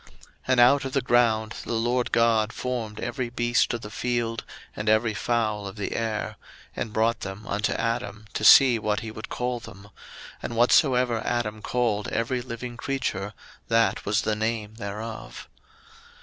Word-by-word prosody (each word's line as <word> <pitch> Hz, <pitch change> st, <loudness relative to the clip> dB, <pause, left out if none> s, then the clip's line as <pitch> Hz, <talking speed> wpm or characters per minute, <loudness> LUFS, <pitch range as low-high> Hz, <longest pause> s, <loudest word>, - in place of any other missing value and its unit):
01:002:019 -, -, -21 dB, 0.4 s
And 130 Hz, -1 st, +3 dB
out 135 Hz, +3 st, +6 dB
of 135 Hz, -, -4 dB
the 135 Hz, -, +2 dB
ground 115 Hz, -3 st, +2 dB
the -, -, -4 dB
LORD 120 Hz, +2 st, 0 dB
God 115 Hz, -2 st, +3 dB
formed 115 Hz, -5 st, -4 dB
every 120 Hz, 0 st, -3 dB
beast 120 Hz, -1 st, +1 dB
of 115 Hz, -, -5 dB
the 105 Hz, -, -8 dB
field, 120 Hz, -1 st, -2 dB, 0.3 s
and 105 Hz, +1 st, -2 dB
every 110 Hz, +1 st, +3 dB
fowl 110 Hz, -2 st, -1 dB
of 95 Hz, -, -8 dB
the 105 Hz, -2 st, -4 dB
air; 110 Hz, -2 st, -2 dB, 0.4 s
and 110 Hz, -, -3 dB
brought 115 Hz, +2 st, +1 dB
them 95 Hz, +3 st, -7 dB
unto 105 Hz, -1 st, -1 dB
Adam 115 Hz, -2 st, -2 dB
to -, -, -3 dB
see 125 Hz, -4 st, +8 dB
what 105 Hz, 0 st, -1 dB
he 110 Hz, -1 st, -6 dB
would 110 Hz, -, -8 dB
call 125 Hz, 0 st, -2 dB
them: 100 Hz, -2 st, -12 dB, 0.5 s
and 120 Hz, -, -5 dB
whatsoever 125 Hz, -1 st, +4 dB
Adam 110 Hz, -3 st, -2 dB
called 115 Hz, -4 st, 0 dB
every 120 Hz, +2 st, -1 dB
living 120 Hz, 0 st, -7 dB
creature, 105 Hz, -7 st, -3 dB, 0.3 s
that 115 Hz, 0 st, +2 dB
was 105 Hz, +2 st, +1 dB
the 110 Hz, -, 0 dB
name 110 Hz, -1 st, -2 dB
thereof. 110 Hz, +1 st, -7 dB
115 Hz, 165 wpm, -26 LUFS, 110-120 Hz, 0.5 s, see